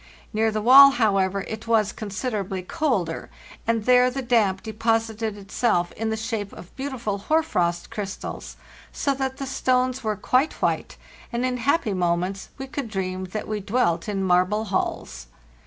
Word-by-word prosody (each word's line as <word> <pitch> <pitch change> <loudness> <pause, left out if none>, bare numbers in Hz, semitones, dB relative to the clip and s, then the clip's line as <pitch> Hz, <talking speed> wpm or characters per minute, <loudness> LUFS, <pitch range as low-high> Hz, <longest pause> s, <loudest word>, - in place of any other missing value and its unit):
Near 220 +1 +2
the 215 -1 -2
wall, 275 +4 +10
how 220 -6 +2
ever, 190 +1 0
it 220 +3 -7
was 215 -3 +3
considerably 200 -3 -4
colder, 195 - -1 0.4
and 230 -2 +1
there 250 0 +5
the 265 +1 -4
damp 215 -6 +2
deposited 225 -1 -1
itself 195 -2 0
in 225 0 -3
the 220 - -1
shape 220 -3 -3
of 175 - -12
beautiful 250 -7 -3
hoar 315 +10 +2
frost 175 - -1
crystals, 200 -2 -6 0.3
so 280 - 0
that 265 -1 -3
the 275 - -4
stones 255 -1 0
were 215 -1 0
quite 255 +9 +1
white; - - -2 0.3
and 240 +1 -1
in 255 -1 -1
happy 245 -3 +1
moments 180 +1 -1
we 270 - -5
could 265 -2 -5
dream 185 -2 -3
that 200 +4 -5
we 215 -1 -2
dwelt 200 -4 0
in 195 -2 -1
marble 185 +4 +2
halls. - - -3
220 Hz, 165 wpm, -24 LUFS, 195-250 Hz, 0.4 s, wall